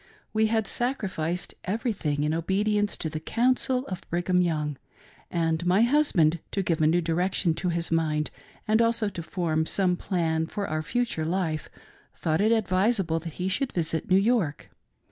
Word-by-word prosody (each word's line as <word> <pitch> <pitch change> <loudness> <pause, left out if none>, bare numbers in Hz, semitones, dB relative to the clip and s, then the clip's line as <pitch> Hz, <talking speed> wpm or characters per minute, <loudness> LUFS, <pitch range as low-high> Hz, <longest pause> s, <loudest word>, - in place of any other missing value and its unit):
We 220 0 +3
had 220 -1 +1
sacrificed 190 - -2
everything 190 - -1
in 150 +1 +1
obedience 205 +5 0
to - - -3
the 155 0 -4
"counsel" 250 +7 +1
of 185 -8 -5
Brigham 180 +1 +1
Young; 150 -5 -1 0.5
and 165 -1 0
my 185 +5 +4
husband, 235 - +3
to 195 - 0
give 165 -2 0
a 155 - +5
new 170 +3 +3
direction 175 +1 +1
to 180 +3 -2
his 170 -1 -1
mindj 155 -2 +1 0.4
and 220 +2 +4
also 230 -2 +2
to 180 -3 -6
form 160 -2 -1
some 185 -2 +2
plan 165 -4 -1
for 200 +3 -3
our 155 0 -1
future 230 -2 -1
life, 160 -2 -1 0.5
thought 160 +3 0
it 215 +2 +3
advisable 195 -4 +2
that 165 -1 -7
he 180 +3 -3
should 250 +8 -1
visit 165 -2 -1
New 185 - +6
York. 195 -8 +1
180 Hz, 165 wpm, -27 LUFS, 160-210 Hz, 0.5 s, New